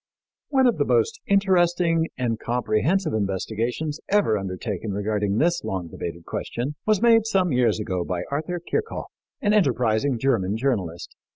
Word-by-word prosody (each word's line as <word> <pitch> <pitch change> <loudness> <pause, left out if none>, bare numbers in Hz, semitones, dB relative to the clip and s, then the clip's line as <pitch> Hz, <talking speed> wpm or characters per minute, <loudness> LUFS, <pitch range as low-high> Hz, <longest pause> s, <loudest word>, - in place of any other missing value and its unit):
One 265 -2 +3
of 245 - +2
the - - +3
most 450 -1 +1
interesting 175 -4 +3
and 115 -3 -1
comprehensive 125 - 0
investigations 110 +9 -2
ever 200 - +3
undertaken 100 +1 -4
regarding 105 0 -1
this 170 +6 +2
long 90 -3 -3
debated 85 +1 -6
question 125 +5 -4
was 215 0 +2
made 225 -2 +5
some 190 -5 +2
years 125 -3 +2
ago 95 -4 -2
by 90 0 -3
Arthur 160 +5 -2
Kirchhoff, 440 - -3 0.3
an 205 - +3
enterprising 125 - +2
German 110 -5 +1
journalist. 100 -10 -2
125 Hz, 145 wpm, -24 LUFS, -, 0.3 s, made